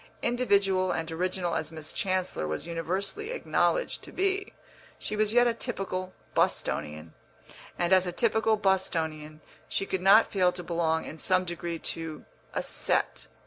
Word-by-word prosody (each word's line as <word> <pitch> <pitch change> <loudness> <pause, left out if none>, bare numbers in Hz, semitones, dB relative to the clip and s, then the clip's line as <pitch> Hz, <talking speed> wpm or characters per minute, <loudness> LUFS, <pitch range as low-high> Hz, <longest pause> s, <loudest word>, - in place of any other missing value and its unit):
Individual 195 -6 +2
and 165 0 -2
original 180 +1 -1
as 155 -1 -2
Miss 155 -1 -7
Chancellor 185 - -1
was 80 - -3
universally 185 - -3
acknowledged - - 0
to - - -11
be, 390 +1 0 0.5
she 210 - -4
was 215 0 +2
yet 245 +1 +5
a 240 - +3
typical 195 -6 -3 0.2
Bostonian, 75 +2 0 0.6
and 175 +1 +2
as 185 -1 +5
a - - -1
typical 220 +2 +2
Bostonian 160 -6 0 0.3
she 195 - 0
could 190 -2 -2
not 200 +4 +7
fail 185 -3 +3
to 180 - -6
belong 165 -2 0
in 155 - -8
some 185 +2 +2
degree 170 -1 -4
to 160 -1 -5 0.3
a - - -2
"set." - - 0
185 Hz, 150 wpm, -28 LUFS, 165-205 Hz, 0.6 s, not